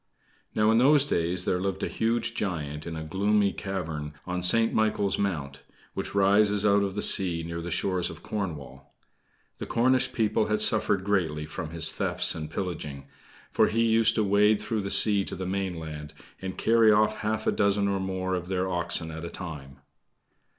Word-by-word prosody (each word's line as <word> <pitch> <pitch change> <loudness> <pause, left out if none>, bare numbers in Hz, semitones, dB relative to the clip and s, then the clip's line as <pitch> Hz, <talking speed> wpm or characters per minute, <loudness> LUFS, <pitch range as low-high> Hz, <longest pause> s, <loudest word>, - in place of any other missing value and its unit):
Now, 105 0 +3
in 115 - +4
those 140 +2 +5
days 90 -5 0
there 90 - 0
lived 95 0 -3
a - - 0
huge 115 0 -1
giant 75 -6 -4
in 85 - -5
a 80 - -5
gloomy 100 +4 +1
cavern 80 -7 -5
on 90 0 -3
St. 115 +6 +3
Michael's 105 -2 0
Mount, 75 -9 -3 0.3
which - - -5
rises 100 +1 +3
out 100 0 +4
of 100 -1 -2
the 105 - -2
sea 85 -4 +3
near 85 0 -5
the 85 - -6
shores 90 +1 -1
of 80 - -11
Cornwall. 75 -10 -6 0.6
The - - -5
Cornish 130 +2 +2
people 110 -2 0
had 105 0 0
suffered 100 -3 +2
greatly 85 -7 -1
from 75 +1 -6
his 80 -1 +2
thefts - - +1
and 75 -1 -6
pillaging; 75 -6 -5 0.5
for - - +3
he 115 +1 +1
used 115 0 +3
to 110 - +2
wade 105 +1 +3
through 110 -3 -2
the 100 - -4
sea 100 -1 +4
to - - -6
the 95 - -5
mainland, 80 -6 -5 0.3
and 95 -1 -6
carry 115 -1 +4
off 105 0 +2
half 110 0 -2
a - - +2
dozen 100 -1 +1
or 100 -1 -1
more 95 0 -3
of 90 -1 -3
their 95 0 -1
oxen 85 -2 -1
at 80 +1 -7
a 85 - -5
time. 70 -7 -9
95 Hz, 185 wpm, -27 LUFS, 85-105 Hz, 0.6 s, those